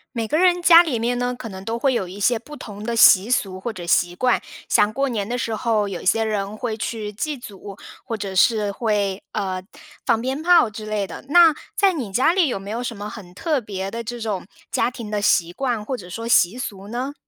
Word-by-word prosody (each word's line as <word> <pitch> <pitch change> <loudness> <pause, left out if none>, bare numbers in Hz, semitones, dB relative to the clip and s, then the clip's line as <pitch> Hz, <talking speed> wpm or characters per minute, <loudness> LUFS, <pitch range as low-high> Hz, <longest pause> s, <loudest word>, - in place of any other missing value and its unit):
每 225 -1 -2
个 305 - +1
人 355 -1 +3
家 335 -1 +9
里 305 -9 -1
面 245 +2 -1
呢， 245 0 -1
可 230 -2 -7
能 190 0 -9
都 225 +2 -3
会 260 +2 +1
有 200 -6 -1
一 190 +3 -9
些 230 +3 +2
不 295 +6 -11
同 205 -6 -9
的 235 +1 -2
习 215 -1 +7
俗 190 -7 0
或 235 +4 -4
者 180 -5 -8
习 175 0 +2
惯。 250 +6 +2 0.3
像 210 - +3
过 275 +5 0
年 215 -6 -2
的 245 - -1
时 230 -2 -2
候 215 -2 0
有 190 -3 -5
一 - - -11
些 225 +4 +3
人 210 -1 -2
会 225 -1 -3
去 215 -2 -4
祭 295 +8 -3
祖， 200 -4 -10 0.3
或 230 -3 -4
者 200 -2 -5
是 210 +1 +3
会， 200 -3 -1
呃， 190 -3 -2 0.5
放 230 -2 +3
鞭 260 +5 -3
炮 350 -4 +5
之 215 0 -8
类 210 -2 -1
的， - - -9
那 335 0 +7 0.2
在 390 -2 +4
你 255 - -4
家 260 - +3
里 360 -3 +3
有 245 - -2
没 195 +1 -8
有 230 +2 -3
什 235 -3 -5
么 205 +1 -6
很 195 -4 -10
特 300 - 0
别 195 -3 -5
的 230 0 -5
这 240 +2 -6
种 210 -5 -4 0.2
家 - - +1
庭 235 -4 -8
的 210 -1 -1
习 175 -4 +2
惯， 235 -2 -2
或 265 - -2
者 180 -7 -10
说 230 +5 -5
习 220 -1 +4
俗 200 -5 -6
呢？ 250 +5 -4
225 Hz, 260 characters per minute, -22 LUFS, 200-250 Hz, 0.5 s, 家